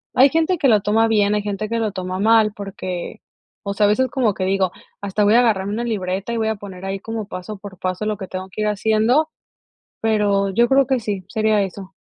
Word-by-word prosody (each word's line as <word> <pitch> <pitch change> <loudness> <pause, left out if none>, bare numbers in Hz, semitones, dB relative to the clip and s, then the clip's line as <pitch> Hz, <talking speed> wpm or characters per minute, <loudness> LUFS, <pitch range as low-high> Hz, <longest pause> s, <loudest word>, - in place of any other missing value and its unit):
Hay 265 +2 +7
gente 325 +5 +1
que 275 - +3
lo 215 -3 +4
toma 220 +3 +2
bien, 210 -2 +2
hay 210 - 0
gente 205 +1 -3
que 230 0 -1
lo 220 -2 -1
toma 185 -1 -4
mal 220 0 +4
porque 185 -3 -6 0.4
o 200 - -3
sea, 205 +1 +2
a - - +3
veces 260 +5 +2
como 245 -7 +1
que 185 - -3
digo: 190 -1 +1 0.3
"hasta 200 +1 0
voy 210 - +4
a 240 - +7
agarrar 205 -5 +1
una 220 +4 -2
libreta 195 -1 -2
y - - -1
voy 220 0 0
a 220 - -1
poner 195 -2 -9
ahí 195 0 -3
como 225 -1 -5
paso 185 +3 -7
por 195 -2 -11
paso 185 +3 -2
lo 215 -2 -1
que 190 -3 -7
tengo 185 0 -6
que 215 - -5
ir 215 - +1
haciendo", 220 +8 +2 0.7
pero 205 -3 +2
yo 235 +5 +3
creo 270 0 +4
que 265 -2 +1
sí, 200 -4 -4
sería 215 -1 +2
eso. 195 0 -7
210 Hz, 240 wpm, -20 LUFS, 195-225 Hz, 0.7 s, Hay